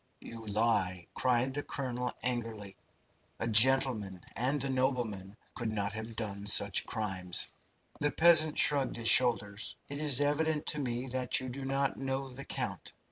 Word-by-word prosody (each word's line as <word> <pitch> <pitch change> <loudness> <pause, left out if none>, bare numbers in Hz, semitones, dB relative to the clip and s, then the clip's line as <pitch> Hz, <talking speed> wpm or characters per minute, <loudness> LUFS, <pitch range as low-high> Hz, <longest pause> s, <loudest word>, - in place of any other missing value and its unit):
"You 115 -1 -10
lie!" 100 -4 0
cried 130 +1 0
the 145 - -3
colonel, 125 -3 -4
angrily. 115 -5 -4 0.6
"A 115 - -2
gentleman 110 -5 +4
and 130 +4 -1
a - - -2
nobleman 120 -7 -2 0.2
could 110 - -4
not 100 -1 -2
have 110 +1 -7
done 100 -2 -5
such 100 -2 +3
crimes." 95 -5 -2 0.5
The 145 - +1
peasant 160 -1 +4
shrugged 140 -3 +2
his 115 -1 +3
shoulders. 110 -4 +4
"It 140 0 -5
is 145 -4 +4
evident 150 +1 0
to 150 - +1
me 125 -2 -3
that 130 0 +1
you 130 -1 -6
do 135 +2 -7
not 135 +1 -1
know 135 0 -3
the 140 +2 -8
count. - - -5
125 Hz, 155 wpm, -31 LUFS, 105-135 Hz, 0.6 s, gentleman